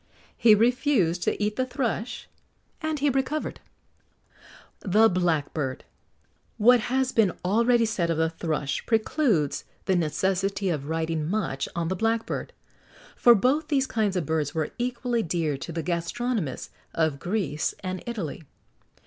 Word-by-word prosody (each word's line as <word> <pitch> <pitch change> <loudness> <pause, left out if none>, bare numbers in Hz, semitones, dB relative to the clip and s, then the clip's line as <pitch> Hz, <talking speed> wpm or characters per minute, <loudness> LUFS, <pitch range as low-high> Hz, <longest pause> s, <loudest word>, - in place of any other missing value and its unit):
He 220 -2 +6
refused 225 - +2
to - - 0
eat 210 0 -1
the 255 - +1
thrush, 245 -2 -3 0.5
and 315 -1 -1
he 285 0 +2
recovered.[XX 270 +3 -2 1.2
56] 185 - -5
THE 225 +1 +7
BLACKBIRD. 155 -6 -1 0.7
What 245 +3 +6
has 260 +3 0
been 210 -8 +3
already 230 +4 +3
said 200 -7 -1
of 165 - 0
the 160 0 +2
thrush 155 -4 -2
precludes 220 - +1 0.2
the 190 - +2
necessity 190 +4 0
of 150 -3 -3
writing 160 -1 -1
much 135 -10 -2
on 170 -1 -1
the 185 - -1
blackbird, 225 +3 -1 0.6
for 240 -1 +6
both 260 +9 +2
these 275 -3 +2
kinds 215 -6 0
of 180 -4 0
birds 155 -1 -1
were 155 -2 -1
equally 245 -1 -1
dear 165 -5 -1
to 155 - -7
the 165 0 -3
gastronomists 180 - -2 0.2
of 160 -4 +1
Greece 175 -4 -1
and 185 -1 -3
Italy. 185 - -4
195 Hz, 140 wpm, -26 LUFS, 165-240 Hz, 1.2 s, THE